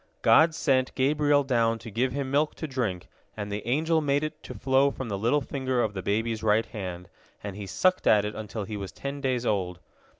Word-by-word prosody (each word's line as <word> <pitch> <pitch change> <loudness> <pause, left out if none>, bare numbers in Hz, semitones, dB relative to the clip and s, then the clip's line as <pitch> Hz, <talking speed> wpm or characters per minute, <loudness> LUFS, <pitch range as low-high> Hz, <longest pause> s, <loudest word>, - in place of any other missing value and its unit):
God 160 0 +6
sent 130 -5 +1
Gabriel 145 +1 +3
down 115 -4 +1
to 115 0 -10
give 125 +5 0
him 135 0 -3
milk 150 +2 +1
to - - -5
drink, 115 -10 -3 0.3
and 105 -1 -4
the 105 0 -3
angel 160 +5 +2
made 145 0 +1
it 155 - -5
to - - -9
flow 135 +1 +3
from 130 -3 -6
the 100 - -2
little 120 +8 +2
finger 130 -2 -1
of 105 - -2
the 95 - -4
baby's 110 +3 -1
right 110 0 +3
hand, 90 -5 -6 0.4
and 100 -2 -5
he 100 -1 -7
sucked 185 - +1
at 105 -1 +5
it 105 - -3
until 110 0 -5
he 105 +1 -5
was 100 -2 -6
ten 140 +1 -6
days 130 -3 0
old. 90 -5 -1
120 Hz, 220 wpm, -27 LUFS, 105-140 Hz, 0.4 s, God